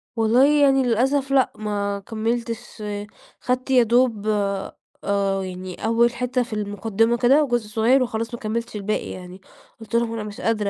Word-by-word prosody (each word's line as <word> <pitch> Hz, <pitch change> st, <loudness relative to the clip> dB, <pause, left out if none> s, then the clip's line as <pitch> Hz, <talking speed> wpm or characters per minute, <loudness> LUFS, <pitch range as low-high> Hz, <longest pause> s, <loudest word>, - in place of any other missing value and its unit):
والله 230 Hz, +4 st, +4 dB, 0.2 s
يعني 270 Hz, -1 st, +4 dB
للأسف 265 Hz, +4 st, +1 dB
لأ 265 Hz, -2 st, +3 dB
ما 205 Hz, -1 st, -2 dB
كمِّلتش، 230 Hz, 0 st, -4 dB, 0.6 s
خدت 255 Hz, +1 st, -1 dB
يا 250 Hz, -2 st, +6 dB
دوب 230 Hz, -2 st, +2 dB, 0.8 s
آآ 195 Hz, -1 st, 0 dB
يعني 185 Hz, +1 st, -7 dB
أول 235 Hz, +1 st, +3 dB
حتّة 250 Hz, +1 st, -1 dB
في 230 Hz, -, -9 dB
المقدمة 215 Hz, +3 st, 0 dB
كده 270 Hz, +6 st, +4 dB
وجزء 240 Hz, -5 st, -1 dB
صغير 235 Hz, +5 st, +3 dB
وخلاص 230 Hz, 0 st, -4 dB
ما 235 Hz, -, -5 dB
كمِّلتش 230 Hz, +1 st, -4 dB
الباقي 210 Hz, +1 st, -2 dB
يعني، 185 Hz, +1 st, -10 dB, 0.4 s
قُلت 225 Hz, +1 st, -6 dB
لهم: 235 Hz, -1 st, +1 dB
"أنا 220 Hz, -2 st, -4 dB
مش 210 Hz, +5 st, -8 dB
قادرة 215 Hz, -3 st, 0 dB
230 Hz, 155 wpm, -22 LUFS, 210-245 Hz, 0.8 s, يا